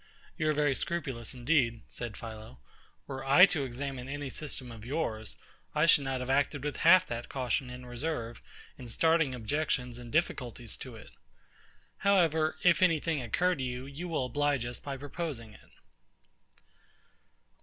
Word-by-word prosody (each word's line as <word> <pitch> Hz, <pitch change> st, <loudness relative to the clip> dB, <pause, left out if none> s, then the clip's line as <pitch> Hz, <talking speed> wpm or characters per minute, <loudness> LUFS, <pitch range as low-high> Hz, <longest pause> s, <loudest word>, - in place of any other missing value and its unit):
You 155 Hz, -, 0 dB
are -, -, +3 dB
very 145 Hz, -2 st, +2 dB
scrupulous, 135 Hz, -7 st, -3 dB
indeed, 120 Hz, -3 st, +1 dB
said 120 Hz, -3 st, -6 dB
PHILO: 110 Hz, -, -9 dB, 0.5 s
were 135 Hz, -1 st, -6 dB
I 140 Hz, +7 st, +8 dB
to 160 Hz, -8 st, 0 dB
examine 130 Hz, 0 st, -5 dB
any 145 Hz, -1 st, -4 dB
system 135 Hz, -4 st, -7 dB
of 110 Hz, -2 st, -10 dB
yours, 115 Hz, -5 st, -3 dB, 0.4 s
I 150 Hz, +1 st, +4 dB
should 150 Hz, -4 st, +5 dB
not 135 Hz, -1 st, -2 dB
have 125 Hz, -, -5 dB
acted 140 Hz, 0 st, +1 dB
with 150 Hz, -2 st, -3 dB
half 185 Hz, +2 st, +7 dB
that 120 Hz, -4 st, -5 dB
caution 130 Hz, -1 st, -1 dB
and 125 Hz, 0 st, -9 dB
reserve, 120 Hz, -2 st, -3 dB, 0.4 s
in 125 Hz, -, -8 dB
starting 160 Hz, +2 st, +2 dB
objections 125 Hz, 0 st, -1 dB
and 120 Hz, -1 st, -10 dB
difficulties 125 Hz, -8 st, -1 dB
to 130 Hz, -3 st, -8 dB
it. 110 Hz, -, -13 dB, 0.9 s
However, 165 Hz, -6 st, +3 dB
if 175 Hz, 0 st, +5 dB
any 165 Hz, -4 st, +5 dB
thing 160 Hz, -2 st, -1 dB
occur 175 Hz, +10 st, +1 dB
to 135 Hz, -6 st, -3 dB
you, 125 Hz, 0 st, -4 dB
you 140 Hz, +6 st, -6 dB
will 155 Hz, -6 st, -1 dB
oblige 145 Hz, -1 st, 0 dB
us 120 Hz, 0 st, -5 dB
by 140 Hz, -1 st, -5 dB
proposing 140 Hz, -6 st, -5 dB
it. -, -, -18 dB
135 Hz, 160 wpm, -31 LUFS, 120-155 Hz, 0.9 s, I